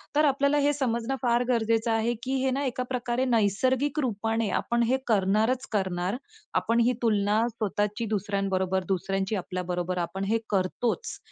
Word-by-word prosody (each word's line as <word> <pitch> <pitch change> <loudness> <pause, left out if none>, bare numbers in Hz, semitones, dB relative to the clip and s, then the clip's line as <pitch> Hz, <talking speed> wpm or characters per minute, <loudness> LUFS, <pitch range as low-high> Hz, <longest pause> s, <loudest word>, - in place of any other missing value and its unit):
तर 300 +1 +5
आपल्याला 280 +1 +2
हे 290 +1 +3
समजणं 250 -2 -1
फार 240 -1 +2
गरजेचं 230 -1 +1
आहे 225 +1 +1
की 265 +1 -1
हे 265 - +2
ना 275 +2 -1
एका 255 -1 -2
प्रकारे 250 0 -1
नैसर्गिक 255 +6 +1
रूपाने 225 -3 0
आपण 235 0 0
हे 250 +3 +2
करणारच 220 +4 +2
करणार. 190 -1 -1 0.4
आपण 230 +1 +1
ही 250 - +3
तुलना 210 -2 +2
स्वतःची 210 0 -2
दुसऱ्यांबरोबर, 190 -2 0
दुसऱ्यांची 195 +2 -1
आपल्याबरोबर 180 -1 -3
आपण 175 +3 -2
हे 225 +1 +2
करतोच. 210 - -1
225 Hz, 150 wpm, -27 LUFS, 195-250 Hz, 0.4 s, तर